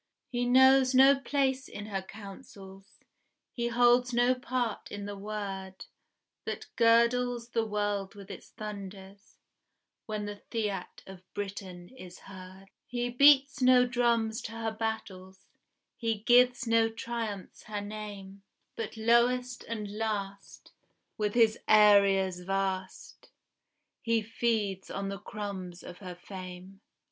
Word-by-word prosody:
He 245 Hz, -1 st, -1 dB
knows 260 Hz, +1 st, +5 dB
no 270 Hz, +1 st, +7 dB
place 270 Hz, -1 st, 0 dB
in 205 Hz, -, -8 dB
her 195 Hz, -2 st, -3 dB
councils, 195 Hz, -1 st, -12 dB, 0.6 s
He 235 Hz, -1 st, -2 dB
holds 245 Hz, +1 st, +3 dB
no 245 Hz, +1 st, +4 dB
part 250 Hz, -2 st, -3 dB
in 205 Hz, 0 st, -6 dB
the 205 Hz, 0 st, -6 dB
word 195 Hz, -2 st, -6 dB, 0.6 s
That -, -, -4 dB
girdles 235 Hz, +1 st, +3 dB
the 230 Hz, -1 st, 0 dB
world 205 Hz, -2 st, -2 dB
with 200 Hz, 0 st, -11 dB
its -, -, -10 dB
thunders 200 Hz, -1 st, -9 dB, 0.7 s
When 215 Hz, -1 st, -3 dB
the 205 Hz, 0 st, -7 dB
fiat 205 Hz, -5 st, -3 dB
of 185 Hz, -1 st, -13 dB
Britain 190 Hz, -3 st, -6 dB
is 185 Hz, -9 st, -12 dB
heard: 190 Hz, 0 st, -12 dB, 0.2 s
He 245 Hz, 0 st, -2 dB
beats 280 Hz, +2 st, +5 dB
no 250 Hz, 0 st, +6 dB
drums 235 Hz, -3 st, +1 dB
to 225 Hz, -, -7 dB
her 225 Hz, -1 st, -3 dB
battles, 195 Hz, -4 st, -5 dB, 0.5 s
He 225 Hz, -3 st, -2 dB
gives 245 Hz, +1 st, +4 dB
no 230 Hz, -1 st, +3 dB
triumphs 225 Hz, -3 st, -6 dB
her 210 Hz, -1 st, -4 dB
name, 205 Hz, -2 st, -8 dB, 0.3 s
But 225 Hz, 0 st, -5 dB
lowest 240 Hz, +2 st, +2 dB
and 210 Hz, -2 st, -5 dB
last, 200 Hz, -3 st, -5 dB, 0.4 s
with 210 Hz, 0 st, -2 dB
his 225 Hz, -2 st, +4 dB
areas 200 Hz, -3 st, +5 dB
vast, 190 Hz, 0 st, -4 dB, 0.7 s
He 230 Hz, -1 st, +1 dB
feeds 215 Hz, -4 st, -1 dB
on 195 Hz, 0 st, -4 dB
the 195 Hz, 0 st, -5 dB
crumbs 195 Hz, -4 st, -7 dB
of 180 Hz, -, -10 dB
her 180 Hz, -3 st, -8 dB
fame. 185 Hz, +1 st, -10 dB
215 Hz, 125 wpm, -29 LUFS, 195-240 Hz, 0.7 s, no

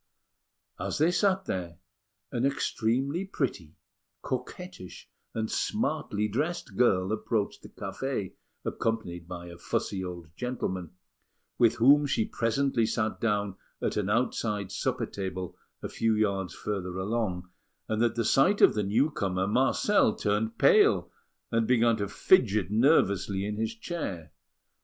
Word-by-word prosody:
As -, -, -2 dB
they 160 Hz, +4 st, +3 dB
sat 190 Hz, 0 st, +2 dB
there, 85 Hz, -, -4 dB, 0.5 s
an 120 Hz, -, -1 dB
extremely 135 Hz, +4 st, 0 dB
pretty, 115 Hz, -, -3 dB, 0.5 s
coquettish, 175 Hz, -, -6 dB, 0.3 s
and 110 Hz, -1 st, -2 dB
smartly 155 Hz, -, -1 dB
dressed 155 Hz, -, -3 dB
girl 95 Hz, -6 st, +3 dB
approached 110 Hz, -1 st, -1 dB
the -, -, -12 dB
café, 135 Hz, -8 st, -4 dB, 0.3 s
accompanied 90 Hz, -7 st, -2 dB
by 90 Hz, -1 st, -7 dB
a 85 Hz, 0 st, -11 dB
fussy 95 Hz, +2 st, -2 dB
old 85 Hz, -3 st, -8 dB
gentleman, 95 Hz, -8 st, -3 dB, 0.7 s
with 115 Hz, -2 st, +5 dB
whom 145 Hz, +5 st, +5 dB
she 110 Hz, -5 st, +1 dB
presently 115 Hz, 0 st, +1 dB
sat 110 Hz, -1 st, -1 dB
down 105 Hz, -4 st, 0 dB, 0.2 s
at -, -, -1 dB
an 105 Hz, -2 st, -1 dB
outside 105 Hz, -3 st, 0 dB
supper -, -, -1 dB
table 95 Hz, -2 st, -5 dB, 0.3 s
a -, -, -2 dB
few 115 Hz, -1 st, +1 dB
yards 100 Hz, -3 st, 0 dB
further 95 Hz, -3 st, -4 dB
along; 95 Hz, -3 st, -2 dB, 0.4 s
and 110 Hz, 0 st, -1 dB
at 120 Hz, -1 st, +1 dB
the 115 Hz, -1 st, 0 dB
sight 180 Hz, -, +4 dB
of -, -, +7 dB
the 105 Hz, -, 0 dB
newcomer, 100 Hz, -4 st, +1 dB
Marcel 130 Hz, -, +3 dB
turned 105 Hz, +2 st, -1 dB
pale, -, -, +4 dB, 0.4 s
and 115 Hz, -1 st, +1 dB
began 120 Hz, -2 st, +4 dB
to 100 Hz, -1 st, -2 dB
fidget 105 Hz, -, +3 dB
nervously 100 Hz, -, +3 dB
in 105 Hz, 0 st, -3 dB
his 110 Hz, +1 st, -2 dB
chair. 100 Hz, -, -5 dB
110 Hz, 135 wpm, -28 LUFS, 95-125 Hz, 0.7 s, of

